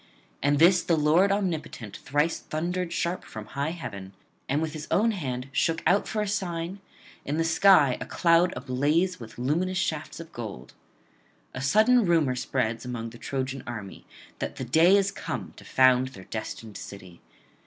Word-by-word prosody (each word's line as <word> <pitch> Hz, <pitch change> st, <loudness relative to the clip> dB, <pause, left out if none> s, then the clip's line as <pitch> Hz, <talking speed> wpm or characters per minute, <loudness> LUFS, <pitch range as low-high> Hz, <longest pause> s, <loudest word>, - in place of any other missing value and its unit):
At 145 Hz, +1 st, +2 dB
this 175 Hz, +3 st, +6 dB
the 165 Hz, -, +1 dB
Lord 160 Hz, +6 st, +4 dB
omnipotent 160 Hz, -, -3 dB
thrice 150 Hz, +4 st, 0 dB
thundered 175 Hz, +3 st, -3 dB
sharp 175 Hz, +2 st, -2 dB
from 110 Hz, -1 st, -8 dB
high 140 Hz, +7 st, -3 dB
heaven, 100 Hz, -, -7 dB, 0.4 s
and 140 Hz, +3 st, +1 dB
with 160 Hz, -1 st, -2 dB
his 155 Hz, -1 st, -7 dB
own 225 Hz, +3 st, +3 dB
hand 130 Hz, -, -4 dB
shook 165 Hz, +4 st, 0 dB
out 200 Hz, +3 st, +3 dB
for 215 Hz, -1 st, -1 dB
a -, -, -3 dB
sign 185 Hz, -2 st, -3 dB, 0.4 s
in 145 Hz, +2 st, -2 dB
the 165 Hz, -, +2 dB
sky 165 Hz, -5 st, +5 dB
a -, -, -5 dB
cloud 170 Hz, 0 st, +3 dB
ablaze 145 Hz, +8 st, 0 dB
with 110 Hz, -2 st, -11 dB
luminous 170 Hz, +9 st, 0 dB
shafts 155 Hz, -4 st, -2 dB
of 165 Hz, 0 st, -9 dB
gold. 105 Hz, -, -7 dB, 0.8 s
A -, -, -5 dB
sudden 220 Hz, -, +4 dB
rumour 165 Hz, -8 st, +2 dB
spreads 120 Hz, -3 st, -1 dB
among 115 Hz, -2 st, -5 dB
the 120 Hz, -, -13 dB
Trojan 135 Hz, 0 st, -3 dB
array, 105 Hz, -5 st, -7 dB, 0.4 s
that -, -, -4 dB
the 130 Hz, -, -5 dB
day 165 Hz, +10 st, +5 dB
is 195 Hz, 0 st, +1 dB
come -, -, -5 dB
to -, -, -13 dB
found 130 Hz, 0 st, +4 dB
their 120 Hz, -8 st, -11 dB
destined 110 Hz, 0 st, -6 dB
city. 95 Hz, -3 st, -11 dB
150 Hz, 170 wpm, -27 LUFS, 125-175 Hz, 0.8 s, this